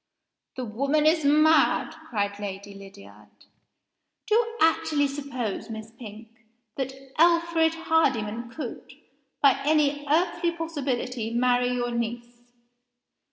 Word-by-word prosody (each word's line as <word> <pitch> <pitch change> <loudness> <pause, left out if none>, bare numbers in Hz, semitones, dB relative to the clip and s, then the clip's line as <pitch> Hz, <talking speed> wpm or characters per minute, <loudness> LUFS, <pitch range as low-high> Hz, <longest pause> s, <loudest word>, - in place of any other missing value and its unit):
"The 255 - -4
woman 275 +7 0
is 315 0 +3
mad!" 305 +2 +4 0.2
cried 205 -2 -2
Lady 200 0 -6
Lydiard. 195 0 -14 1.0
"Do - - -1
you 465 +1 +1
actually 310 -2 +2
suppose, 265 -7 -5
Miss 220 0 -8
Pink, 225 -1 -11 0.5
that 265 -1 -3 0.3
Alfred 335 -1 +3
Hardyman 240 -9 0
could, 260 0 -8 0.5
by 275 -1 +5
any 290 -1 +1
earthly 340 +2 +1
possibility, 260 -8 -3
marry 245 +1 +2
your 240 -1 -2
niece!" 235 +1 -4
265 Hz, 110 wpm, -26 LUFS, 230-315 Hz, 1.0 s, by